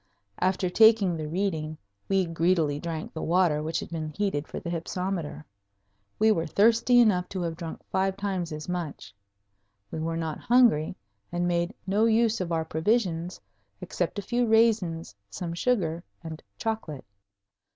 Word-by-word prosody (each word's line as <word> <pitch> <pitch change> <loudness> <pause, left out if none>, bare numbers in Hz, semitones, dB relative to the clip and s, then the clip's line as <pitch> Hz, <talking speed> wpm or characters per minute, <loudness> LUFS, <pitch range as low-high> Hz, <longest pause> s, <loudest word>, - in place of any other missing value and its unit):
After 185 0 +1
taking 215 -2 +5
the 155 -1 -4
reading 160 -3 -2 0.3
we 195 -1 +3
greedily 165 -3 +1
drank 165 -1 -5
the 160 - -5
water 170 -3 +2
which 160 +1 -2
had - - -8
been 160 -2 -3
heated 155 -3 -2
for - - -6
the 170 - -5
hypsometer. 175 -2 -3 0.7
We 220 +1 +4
were 165 -6 0
thirsty 230 +6 +4
enough 190 -6 +3
to 185 -2 -3
have 165 -1 -2
drunk 165 -1 -7
five 190 0 0
times 190 -4 -2
as 155 0 -6
much. 170 - -5 0.8
We - - -4
were 165 +1 -2
not 160 -2 -3
hungry, 230 -11 +3 0.4
and 175 0 0
made 175 0 0
no 205 +3 +2
use 225 -1 +3
of 175 -2 -3
our 160 -1 0
provisions 175 0 0 0.4
except 175 +2 -3
a 205 - -3
few 240 +3 0
raisins, 220 -7 +2 0.2
some 170 - -5
sugar, 175 -5 0 0.2
and 160 -1 -7 0.2
chocolate. 220 - -4
175 Hz, 155 wpm, -27 LUFS, 160-205 Hz, 0.8 s, taking